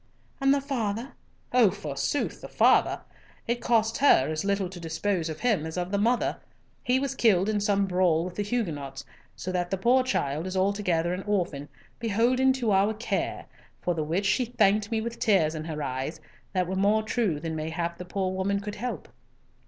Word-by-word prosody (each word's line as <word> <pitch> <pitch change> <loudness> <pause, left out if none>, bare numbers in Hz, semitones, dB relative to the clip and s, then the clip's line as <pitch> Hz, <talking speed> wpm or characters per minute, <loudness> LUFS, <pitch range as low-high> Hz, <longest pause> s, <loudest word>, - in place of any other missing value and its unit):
"And 270 0 +3
the 280 0 +3
father?" 240 -3 -2 0.4
"Oh, 245 -5 +6
forsooth, 175 - -3
the - - -7
father! - - +3 0.5
It 240 +1 -1
cost 225 -1 +2
her 155 - +5
as 155 0 -2
little 200 -1 0
to 180 0 -9
dispose 165 +1 -1
of 155 -1 -6
him 220 -10 +2
as 160 +2 -5
of 180 +1 -2
the 200 - +1
mother. 235 +4 +1 0.5
He 250 +1 +2
was 275 -1 -2
killed 210 -7 +3
in 215 -1 +1
some 200 -1 +2
brawl 180 -3 +2
with 180 - -6
the 205 - -3
Huguenots; 165 - -3 0.3
so 185 - -5
that 175 -1 -1
the 195 - -1
poor 245 +7 +4
child 155 - -1
is 185 0 -3
altogether 185 -3 +1
an 185 - -3
orphan, 175 -8 -1 0.3
beholden 240 +4 +2
to 245 -5 0
our 200 +3 +3
care, 225 +3 -2 0.3
for 175 - -1
which 165 +5 -1
she 210 +6 +2
thanked 210 -3 +2
me 225 -1 0
with 235 +1 -5
tears 175 -8 +3
in 155 -1 -5
her 155 -2 -4
eyes, 135 +4 -3 0.3
that 185 -2 +1
were 185 +2 -3
more 205 +3 +3
true 215 -8 0
than 160 0 -4
mayhap 165 +2 -3
the - - -4
poor 185 +1 -2
woman 195 +1 0
could 205 +1 -6
help." 245 +3 -4
195 Hz, 190 wpm, -27 LUFS, 170-225 Hz, 0.5 s, Oh